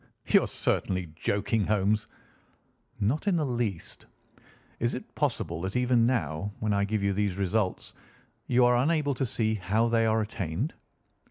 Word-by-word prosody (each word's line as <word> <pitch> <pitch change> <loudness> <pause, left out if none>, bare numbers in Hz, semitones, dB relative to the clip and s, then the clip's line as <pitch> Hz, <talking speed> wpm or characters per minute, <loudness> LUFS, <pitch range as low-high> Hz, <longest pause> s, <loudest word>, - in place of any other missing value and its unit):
"You - - +5
are - - -2
certainly 90 -4 -1
joking, 100 +5 0
Holmes." 105 +1 +1 0.9
"Not 130 - 0
in 195 - +3
the 160 -3 +1
least. 120 -9 -3 0.7
Is - - 0
it - - -9
possible 85 0 -1
that 95 +1 -4
even 125 -2 +3
now, 100 - -1
when 105 -1 0
I 100 0 +2
give 105 0 -1
you 100 0 +2
these 100 -1 0
results, 100 0 -1 0.5
you 125 0 +4
are 120 0 +4
unable 145 +2 +2
to 130 0 -1
see 110 -1 0
how 110 +4 +1
they 115 -1 +3
are 110 0 +2
attained?" 100 - -3
110 Hz, 160 wpm, -28 LUFS, 100-120 Hz, 0.9 s, You